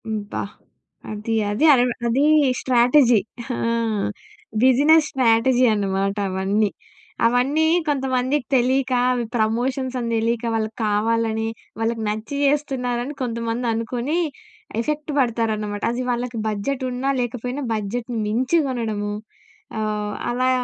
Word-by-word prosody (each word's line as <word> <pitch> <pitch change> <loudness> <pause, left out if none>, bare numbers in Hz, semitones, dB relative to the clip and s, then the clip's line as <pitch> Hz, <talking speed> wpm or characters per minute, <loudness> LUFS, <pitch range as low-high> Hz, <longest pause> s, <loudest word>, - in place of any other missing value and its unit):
అబ్బా! 210 -2 -3 0.7
అది 215 +2 -3 0.2
అది 220 +10 +1
అరెవ 250 -1 +3 0.2
అది 250 +5 +2 0.4
స్ట్రాటజీ 245 -1 +4 0.4
ఆ! - - -5 1.1
బిజినెస్ 290 +5 +5
స్ట్రాటజీ 250 0 +3
అనమాట 195 -1 0
అవన్నీ. 195 +3 +1 0.6
అవన్నీ 255 +7 +2 0.2
కొంతమందికి 265 -1 0
తెలీక 260 +1 +2 0.2
అవి 245 -2 -1
ప్రమోషన్స్ 250 +4 0
అని 235 -1 -3
తెలీక 230 +1 0
వాళ్ళకి 220 0 -2
కావాలని 220 +1 0 0.3
వాళ్ళకి 225 0 -1
నచ్చి 215 +6 -3
చేస్తున్నారని 270 -2 -1
కొంతమంది 235 0 -2
అనుకుని 240 +7 -2 0.6
ఎఫెక్ట్ 300 +4 -3
పడతారనమాట. 220 -4 -1
అది 245 +2 -2
వాళ్ళకి 240 -1 -2
బడ్జెట్ 220 +6 -2
ఉన్నా 260 +2 -1
లేకపోయినా 250 +3 -3
బడ్జెట్‌ని 225 +3 -3
మించి 250 +10 +2
కొనడము 220 -5 -2 0.7
ఆహ్, 210 -1 -2 0.2
అలా 255 +2 +1
240 Hz, 110 wpm, -22 LUFS, 220-260 Hz, 1.1 s, బిజినెస్